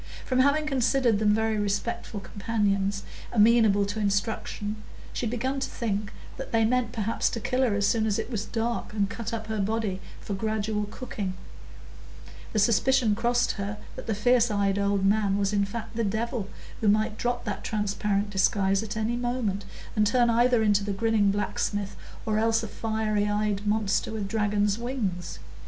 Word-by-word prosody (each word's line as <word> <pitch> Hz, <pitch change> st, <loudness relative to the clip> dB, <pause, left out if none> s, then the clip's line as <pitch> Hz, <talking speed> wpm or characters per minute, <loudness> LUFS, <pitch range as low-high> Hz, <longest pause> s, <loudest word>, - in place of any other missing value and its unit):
From 255 Hz, -1 st, +1 dB
having 285 Hz, +3 st, +3 dB
considered 255 Hz, -5 st, +2 dB
them 210 Hz, -1 st, +3 dB
very 220 Hz, -1 st, +1 dB
respectful 205 Hz, +1 st, -2 dB
companions, 200 Hz, -1 st, -1 dB, 0.3 s
amenable 215 Hz, -2 st, +5 dB
to 205 Hz, +2 st, -4 dB
instruction, 205 Hz, +1 st, -1 dB, 0.4 s
she 240 Hz, -, -2 dB
had -, -, -1 dB
begun 260 Hz, +4 st, -1 dB
to 265 Hz, 0 st, -2 dB
think 210 Hz, -3 st, -2 dB, 0.3 s
that 270 Hz, -, -7 dB
they 225 Hz, -1 st, +3 dB
meant 245 Hz, 0 st, +1 dB
perhaps 225 Hz, 0 st, 0 dB
to 230 Hz, -, -4 dB
kill 255 Hz, +3 st, 0 dB
her 240 Hz, -6 st, +2 dB
as 205 Hz, 0 st, +1 dB
soon 220 Hz, +1 st, +2 dB
as 205 Hz, -, +1 dB
it -, -, -4 dB
was 210 Hz, -4 st, -1 dB
dark, 230 Hz, 0 st, -2 dB
and 200 Hz, -1 st, 0 dB
cut 230 Hz, -1 st, -5 dB
up 225 Hz, -1 st, -3 dB
her 220 Hz, -1 st, -3 dB
body 205 Hz, -2 st, -1 dB, 0.2 s
for 205 Hz, -, -5 dB
gradual 215 Hz, +1 st, -1 dB
cooking; 205 Hz, -4 st, -5 dB, 1.2 s
the -, -, -2 dB
suspicion 230 Hz, +2 st, +3 dB
crossed 240 Hz, +3 st, +1 dB
her 200 Hz, +1 st, -3 dB, 0.2 s
that -, -, -8 dB
the 220 Hz, -, 0 dB
fierce 240 Hz, +3 st, +3 dB
eyed 200 Hz, -1 st, +1 dB
old 200 Hz, -1 st, +1 dB
man 200 Hz, -1 st, +3 dB
was 200 Hz, 0 st, 0 dB
in 200 Hz, -1 st, +2 dB
fact 225 Hz, +2 st, -6 dB
the 230 Hz, -, 0 dB
Devil, 220 Hz, 0 st, -2 dB, 0.3 s
who 220 Hz, -, 0 dB
might 215 Hz, +1 st, +3 dB
drop 245 Hz, 0 st, -1 dB
that 205 Hz, -3 st, -4 dB
transparent 205 Hz, -1 st, -1 dB
disguise 195 Hz, 0 st, +2 dB
at 220 Hz, 0 st, -5 dB
any 220 Hz, +2 st, 0 dB
moment, 240 Hz, -5 st, -2 dB, 0.3 s
and 210 Hz, -1 st, +3 dB
turn 240 Hz, +1 st, +3 dB
either 240 Hz, 0 st, +4 dB
into 205 Hz, -1 st, +3 dB
the 200 Hz, 0 st, -2 dB
grinning 215 Hz, 0 st, +2 dB
blacksmith, 205 Hz, 0 st, -1 dB, 0.3 s
or 215 Hz, -1 st, +1 dB
else 225 Hz, +1 st, +2 dB
a -, -, -3 dB
fiery 215 Hz, -1 st, -1 dB
eyed 205 Hz, 0 st, -1 dB
monster 210 Hz, 0 st, +1 dB
with 215 Hz, -3 st, -3 dB
dragon's 205 Hz, 0 st, +1 dB
wings. 220 Hz, -8 st, -3 dB
215 Hz, 180 wpm, -27 LUFS, 205-230 Hz, 1.2 s, amenable